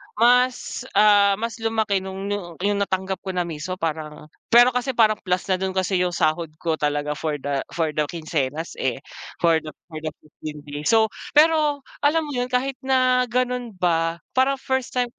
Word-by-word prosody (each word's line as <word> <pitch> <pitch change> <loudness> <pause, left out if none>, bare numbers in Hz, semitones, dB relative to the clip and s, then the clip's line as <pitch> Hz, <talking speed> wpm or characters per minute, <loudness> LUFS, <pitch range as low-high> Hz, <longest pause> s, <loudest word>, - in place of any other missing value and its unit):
mas, 250 +2 +2
ah, 205 -1 +6
mas 230 0 -3
lumaki 220 -3 0
nung 190 +1 -6
yu 205 - 0 0.3
yung 205 0 +1
natanggap 190 -1 -1
ko 190 -1 -5
na 180 - +1
mismo 170 +2 -5
parang 155 -3 -5 0.2
pero 245 +1 +8
kasi 250 +2 -1
parang 215 -2 +4
plus 180 0 0
na 185 - +3
dun 190 0 -2
kasi 190 0 +1
yung 180 -1 0
sahod 160 +1 +1
ko 160 -2 0
talaga 145 0 0
for 155 -2 -2
the 140 -1 -1
for 165 -2 +1
the 150 0 0
kinsenas, 155 -1 -3
eh, 130 0 -1 0.4
for 165 -1 +5
the 155 -2 -9 0.2
for 155 - -6
the 155 - -6 0.2
15 150 0 -9
days. 145 0 -7
So, 220 -1 +5 0.3
pero 300 -2 +4 0.2
alam 305 0 +2
mo - - -5
yun, 245 - 0
kahit 255 +1 -1
na 255 -1 +3
ganon 250 -2 -1
ba 165 -2 0 0.2
parang 270 +1 +4
first 265 -1 -2
time 245 -1 +1
190 Hz, 185 wpm, -23 LUFS, 160-245 Hz, 0.4 s, pero